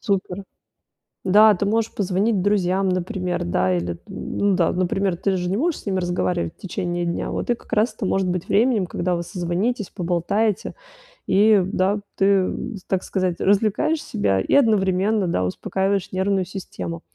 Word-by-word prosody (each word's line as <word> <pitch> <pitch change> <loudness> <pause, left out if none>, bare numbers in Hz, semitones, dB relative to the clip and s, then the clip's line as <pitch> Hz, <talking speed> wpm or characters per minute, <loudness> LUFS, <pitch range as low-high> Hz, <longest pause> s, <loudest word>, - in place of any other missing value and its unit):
супер. 195 -2 -2 0.8
Да, 210 +3 +6
ты 200 +2 -2
можешь 225 +2 0
позвонить 200 +2 +1
друзьям, 190 -1 +1
например. 180 0 -2
Да, 90 +1 +1
или 85 0 -2
т 85 - -11
ну 200 -1 -1
да, 170 -3 +2
например, 185 +1 0
ты 195 0 0
же 180 0 -2
не 195 - 0
можешь 330 +2 0
с - - -20
ними 190 -1 0
разговаривать 95 - -1
в - - -44
течение 175 -1 -3
дня. 170 0 -2
Вот - - -3
и - - +4
как - - -18
раз 220 +3 +2
это 205 - -4
может 190 0 +1
быть 180 -1 -2
временем, 220 -3 +2
когда 180 +1 -1
вы 170 - -2
созвонитесь, 185 +5 -2
поболтаете, 185 +4 -1 0.5
и, 205 0 +5
да, 195 +2 0 0.2
ты, 195 - +1
э, 195 -2 +3 0.4
так 190 -1 0
сказать, 185 -3 -1
развлекаешь 215 +10 +1
себя 100 - 0
и - - -2
одновременно, 210 -4 +3
да, 90 - 0
успокаиваешь 190 - -1
нервную 190 0 0
систему. 175 -3 -6
190 Hz, 170 wpm, -22 LUFS, 175-205 Hz, 0.8 s, Да